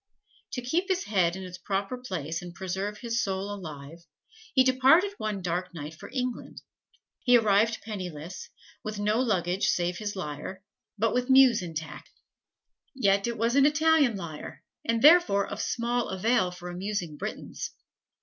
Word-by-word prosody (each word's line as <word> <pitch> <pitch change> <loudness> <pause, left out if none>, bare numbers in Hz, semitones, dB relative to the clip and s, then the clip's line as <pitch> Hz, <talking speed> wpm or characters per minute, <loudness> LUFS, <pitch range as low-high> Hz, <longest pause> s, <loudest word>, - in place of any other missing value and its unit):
To 250 - -3
keep 335 +10 0
his 375 -1 0
head 185 -4 +1
in 190 - -6
its 180 -1 -8
proper 195 +6 -2
place 170 - -4
and 175 -1 -9
to - - -16
preserve 190 +2 -3
his 235 -1 -1
soul 195 +1 -2
alive, 155 -4 -8 0.5
he 260 -2 +5
departed 265 +10 +4
one 210 -3 -3
dark 180 +1 -2
night 150 0 -6
for 160 - -11
England. 255 -2 -4 0.6
He 245 -1 +5
arrived 220 0 +2
penniless, 185 - -6 0.3
with 215 -1 -4
no 210 +2 +1
luggage 190 -6 +1
save 175 0 0
his 205 -1 -4
lyre, 180 +2 -6 0.3
but 225 +2 +1
with 250 +1 0
muse 260 -5 +6
intact. 160 -2 -7 0.9
Yet 200 -4 +2
it 235 -1 -3
was 230 +3 +1
an 280 0 +6
Italian 305 -5 +3
lyre, 160 -5 -8 0.2
and 230 +1 0
therefore 300 - +6
of - - -5
small 240 0 -1
avail 190 +1 +2
for 180 0 -8
amusing 180 -3 -3
Britons. - - -5
205 Hz, 160 wpm, -28 LUFS, 180-245 Hz, 0.9 s, muse